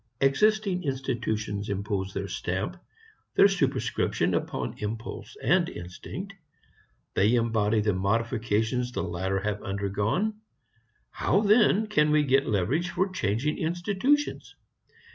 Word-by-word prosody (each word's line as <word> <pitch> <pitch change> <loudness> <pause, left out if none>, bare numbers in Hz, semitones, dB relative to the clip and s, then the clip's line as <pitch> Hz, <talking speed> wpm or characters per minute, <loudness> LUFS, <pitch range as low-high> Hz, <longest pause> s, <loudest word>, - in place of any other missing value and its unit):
Existing 195 +7 +2
institutions 110 -7 -2
impose 100 -1 -2
their 100 0 -4
stamp, 95 - -3 0.6
their - - +8
superscription, 195 -2 0
upon - - -2
impulse 110 +2 -6
and - - +3
instinct. 90 - -8 0.8
They 105 +5 +3
embody 110 -2 +2
the 105 -1 +1
modifications 115 +4 0
the - - -2
latter 95 +2 -2
have 105 0 -2
undergone. 100 - -1 0.7
How 200 - +1
then 215 0 +4
can 205 -8 +2
we 150 0 +4
get 135 0 +2
leverage 120 - 0
for 190 +1 0
changing 150 - -1
institutions? 195 - 0
115 Hz, 110 wpm, -27 LUFS, -, 0.8 s, their